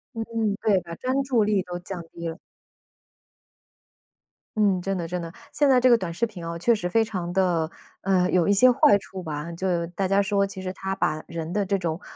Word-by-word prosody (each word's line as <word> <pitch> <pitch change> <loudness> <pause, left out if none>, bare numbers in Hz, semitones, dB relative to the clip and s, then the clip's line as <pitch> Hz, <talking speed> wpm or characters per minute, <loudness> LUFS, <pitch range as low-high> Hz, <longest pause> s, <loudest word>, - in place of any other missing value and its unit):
嗯， 225 - -2 0.4
对， 195 -4 +3
把 170 0 -9
专 260 +5 -1
注 255 -4 +2
力 205 -2 +2
都 175 0 -6
降 180 0 -7
低 170 0 -6
了。 165 +1 -5 2.2
嗯， 200 -4 +3
真 195 +1 -2
的 170 -2 -3
真 180 +1 -3
的。 165 -1 -6 0.2
现 290 -1 +3
在 255 -2 +6
这 255 0 +4
个 235 - +7
短 180 -6 -4
视 230 +8 0
频 190 -7 -9
啊， 170 0 -4
确 230 +7 +3
实 180 -4 -3
非 225 +4 +3
常 185 -5 -4
的， 175 -4 +1 0.3
嗯， 185 -1 +2
有 180 0 +3
一 200 - +5
些 255 +6 +6
坏 225 -4 +5
处 190 -2 -9
吧。 150 0 -5
就 175 -1 -1
大 185 +2 -2
家 195 +1 +4
说 200 0 +1
其 195 -1 -7
实 185 0 -4
它 190 0 -4
把 155 -4 -1
人 165 +1 -5
的 205 -1 +1
这 195 +1 +1
种， 170 -1 -3
185 Hz, 230 characters per minute, -25 LUFS, 170-205 Hz, 2.2 s, 个